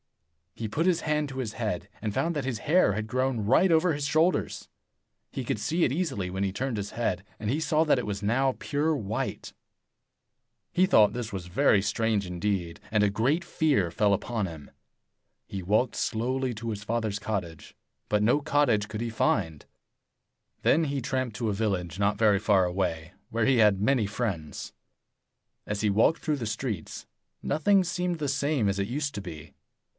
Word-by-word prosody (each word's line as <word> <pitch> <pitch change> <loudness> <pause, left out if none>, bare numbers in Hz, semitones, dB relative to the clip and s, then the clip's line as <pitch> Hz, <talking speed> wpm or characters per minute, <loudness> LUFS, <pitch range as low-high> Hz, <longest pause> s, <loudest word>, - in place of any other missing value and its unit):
He 115 - -4
put 150 +11 -1
his 180 -3 +2
hand 150 -1 0
to 135 - -8
his 120 -5 -3
head, 105 -7 -3
and 105 -1 -2
found 170 +7 0
that 145 - -1
his 125 -4 -3
hair 155 - +3
had 110 +2 -3
grown 130 0 0
right 150 - +4
over 165 +1 +4
his 145 -1 -3
shoulders. 160 +4 +1 0.6
He - - -4
could - - -2
see 170 +2 0
it - - 0
easily 135 - -2
when 95 +2 -2
he 95 - 0
turned 125 +3 -2
his 100 0 -4
head, 95 -6 -2 0.2
and 105 - -3
he 140 +6 +1
saw 155 0 +2
that 150 -5 +3
it 125 - -3
was 100 -1 -4
now 130 +5 +2
pure 150 +2 0
white. 110 -5 -4 1.2
He 185 - +4
thought 105 - +5
this 120 -2 -4
very 95 +1 +2
strange 110 0 0
indeed, 90 -1 -2
and 105 -1 +3
a 105 - +4
great 130 - +1
fear 135 - +1
fell 100 +3 +2
upon 110 +1 -1
him. 80 -4 -10 0.8
He 95 -2 -5
walked 110 +6 +1
slowly 125 +3 -1
to 115 +2 -8
84 - - -1
his 105 -1 -5
father's 110 -2 -1
cottage, 95 -7 -5 0.3
but 105 0 +2
no 125 +7 +3
cottage 125 -8 +2
could 110 0 -5
he 120 - -2
find. 80 -8 0 1.0
Then 160 +2 +4
he 140 -1 -1
tramped 130 -2 -2
to 115 -3 -1
a - - 0
village 95 -5 -2
not 100 +1 +1
very 105 -2 +4
far 100 -3 +3
away, 90 -2 -2 0.2
where 115 0 0
he 135 -2 +4
had 105 -3 +5
many 115 -1 +2
friends. 100 -8 -4 0.9
85 - - -4
As 105 - -2
he 105 - +2
walked 110 +11 +3
through 155 -3 0
the 120 - -4
streets, 110 -5 -4 0.4
nothing 190 +6 +3
seemed 180 0 -2
the 150 -2 -2
same 140 -4 +1
as 100 0 0
it 100 - 0
used 145 +3 -2
to 100 - -3
be. 80 -6 -9
110 Hz, 190 wpm, -27 LUFS, 100-140 Hz, 1.2 s, thought